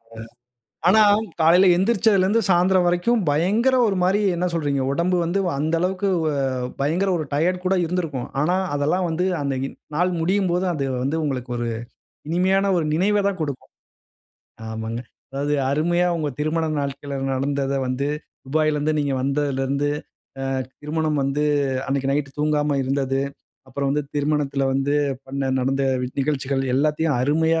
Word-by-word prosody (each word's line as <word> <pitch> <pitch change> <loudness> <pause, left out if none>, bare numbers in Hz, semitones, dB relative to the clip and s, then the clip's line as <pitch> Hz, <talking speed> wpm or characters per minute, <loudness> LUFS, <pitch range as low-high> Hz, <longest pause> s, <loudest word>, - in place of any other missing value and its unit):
அ - - -11 0.7
ஆனா 220 +3 +6 0.4
காலையில 175 +4 +6
எந்திருச்சதிலிருந்து 205 +1 +3
சாயந்திரம் 180 +1 +4
வரைக்கும் 180 +7 +2
பயங்கர, 205 - +2
ஒரு 195 - 0
மாரி 190 +3 +3 0.2
என்ன 175 +1 -1
சொல்றீங்க? 145 -4 0
உடம்பு 175 +4 +1
வந்து 175 +4 0 0.2
அந்த 155 +3 0
அளவுக்கு 190 +2 0 0.2
வ - - +2 0.5
பயங்கர 170 +8 +1
ஒரு 155 - -3
டயர்ட் 180 +5 0
கூட 190 +1 +2
இருந்திருக்கும். 160 -7 -3
ஆனா 175 +5 +2 0.2
அதெல்லாம் 155 +6 +1
வந்து 165 +3 0 0.2
அந்த 140 -1 -1
இன் - - -11 0.2
நாள் 180 +3 +2
முடியும்போது 185 0 +1
அந்த 140 -4 -2 0.2
வந்து 140 +5 0
உங்களுக்கு 130 -3 -3
ஒரு 120 0 -2 0.6
இனிமையான 190 +3 +2
ஒரு 165 - 0
நினைவதான் 200 +2 +1
குடுக்கும். 140 -4 -5 1.0
ஆமாங்க. 110 +1 -4 0.3
அதாவது 140 +2 -1 0.2
அருமையா 175 +4 +2
உங்க 155 -2 -1
திருமண 160 +2 0
நாள்கள்ல 140 0 -4 0.2
நடந்தத 140 +1 -1
வந்து, 130 +2 -1 0.4
துபாயிலிருந்து 155 +1 +1
நீங்க 145 -1 0
வந்ததிலிருந்து, 140 0 0 0.5
அ - - -2 0.4
திருமணம் 155 0 -1
வந்து 140 +2 0 0.4
அன்னைக்கு 135 0 0
நைட்‌டு 145 -1 -1
தூங்காம 150 -1 +1
இருந்தது. 135 0 0 0.5
அப்புறம் 140 +1 -2
வந்து 145 +1 0
திருமணத்தில 145 -2 0
வந்து 135 +2 0 0.3
பண்ண 135 0 -2
நடந்த 135 +2 0 0.4
நிகழ்ச்சிகள் 135 -1 -1
எல்லாத்தையும் 150 +1 +1
அருமையா 160 +4 +2
150 Hz, 135 wpm, -22 LUFS, 140-180 Hz, 1.0 s, ஆனா